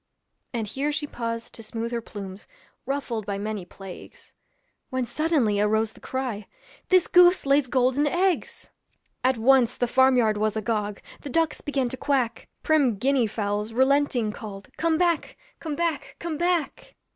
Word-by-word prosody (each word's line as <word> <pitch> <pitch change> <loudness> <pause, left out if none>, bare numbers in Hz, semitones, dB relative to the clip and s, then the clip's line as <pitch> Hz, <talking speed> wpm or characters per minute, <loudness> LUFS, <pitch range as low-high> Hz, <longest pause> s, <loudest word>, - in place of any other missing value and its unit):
And 230 -3 -2
here 275 +8 -2
she 295 0 -2
paused 230 -4 -5
to - - -8
smooth 225 +1 -5
her 235 -1 -2
plumes, 195 -3 -9 0.4
Ruffled 260 -6 -3
by 200 -1 -2
many 210 -2 -4
plagues; 190 0 -12 0.6
When 255 -2 -1
suddenly 275 -8 +1
arose 220 +1 +1
the - - -17
cry, 250 -6 -4 0.4
'This 370 -2 +5
goose 360 -1 +5
lays 275 -1 +3
golden 260 +3 +2
eggs.' 360 +4 -1 0.5
At 260 -1 +3
once 250 +1 +4
the 245 - +1
farm 260 +1 +4
yard 220 -3 +3
was 215 0 0
agog; 210 -2 -2 0.2
The 285 - -7
ducks 325 +2 +1
began 275 -3 -1
to 260 - -6
quack; 260 -5 -1
Prim 280 -9 +3
Guinea 260 +1 +2
fowls 210 +1 -2
relenting 265 -3 +2
called, 200 -3 -9
'Come 330 -1 +1
back, 340 -2 0 0.2
come 310 -3 -4
back, 310 -5 -2
come 335 -2 -4
back.' 345 -1 -1
250 Hz, 155 wpm, -25 LUFS, 215-290 Hz, 0.6 s, This